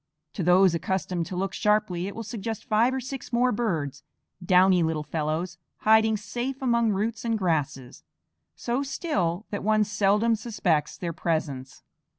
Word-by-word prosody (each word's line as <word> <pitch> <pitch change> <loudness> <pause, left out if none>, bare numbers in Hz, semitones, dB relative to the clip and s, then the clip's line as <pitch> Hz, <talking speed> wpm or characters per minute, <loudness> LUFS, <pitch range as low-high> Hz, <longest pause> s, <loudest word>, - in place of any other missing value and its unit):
To - - -4
those 180 +1 +5
accustomed 175 0 -2
to 185 - -6
look 195 +2 -2
sharply 210 -4 +1
it 200 - -7
will 230 - -5
suggest 220 0 -5
five 225 +3 +3
or 265 - -2
six 260 0 -7
more 250 +1 +2
birds, 160 - -2 0.4
downy 185 0 +5
little 160 -2 0
fellows, 160 +3 -3 0.2
hiding 220 0 +4
safe 245 +5 -4
among 235 -3 +2
roots 215 +3 -1
and 230 -1 0
grasses, 145 -9 -2 0.5
so 245 +3 -2
still 215 - -2
that 205 - -3
one 215 +1 +3
seldom 210 +2 +2
suspects 200 -9 -1
their 170 -2 -4
presence. 150 -6 -3
200 Hz, 155 wpm, -26 LUFS, 170-225 Hz, 0.5 s, those